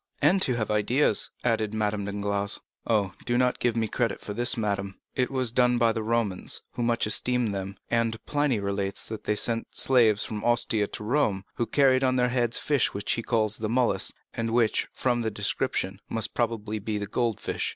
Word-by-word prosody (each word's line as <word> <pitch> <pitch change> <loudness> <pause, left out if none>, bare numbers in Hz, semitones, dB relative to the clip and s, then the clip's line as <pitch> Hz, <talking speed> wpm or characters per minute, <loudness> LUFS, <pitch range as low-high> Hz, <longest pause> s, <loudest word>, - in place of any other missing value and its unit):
"And 175 +7 +4
to 130 -8 +2
have 110 -2 -2
ideas," 105 +3 +2
added 110 -3 0
Madame 105 -1 -1
Danglars. 100 0 -2 0.3
"Oh, 100 -5 +1
do 120 0 0
not 125 0 +2
give 120 -2 +1
me 115 -1 +1
credit 115 +2 -1
for 105 - -6
this, 120 +4 +1
madame; 100 -3 -2
it 125 - 0
was 130 -4 -1
done 125 0 +3
by 115 -1 +4
the 110 0 -2
Romans, 110 -4 -1
who - - -5
much 120 0 +1
esteemed 120 0 +1
them, 100 +1 -5
and 115 -1 +1
Pliny 145 -6 +1
relates 100 -1 -2
that 110 -1 -6
they 105 - +1
sent 115 +2 0
slaves 115 -5 +3
from 105 -1 -5
Ostia 120 -3 +2
to 105 - -7
Rome, 110 -5 +1
who 120 - 0
carried 135 -2 +4
on 130 -1 +2
their 125 -1 +2
heads 120 -2 0
fish 145 -8 +1
which 100 - -2
he 115 - 0
calls 110 -2 0
the 110 -1 -2
mulus, 125 +1 +1 0.2
and 115 0 -2
which, 115 -1 +2
from 120 -2 0
the 110 - 0
description, 100 -2 -2
must 115 -2 -1
probably 110 -3 -1
be 105 +1 -3
the 105 - -3
goldfish. 115 0 -1
115 Hz, 195 wpm, -27 LUFS, 105-120 Hz, 0.3 s, And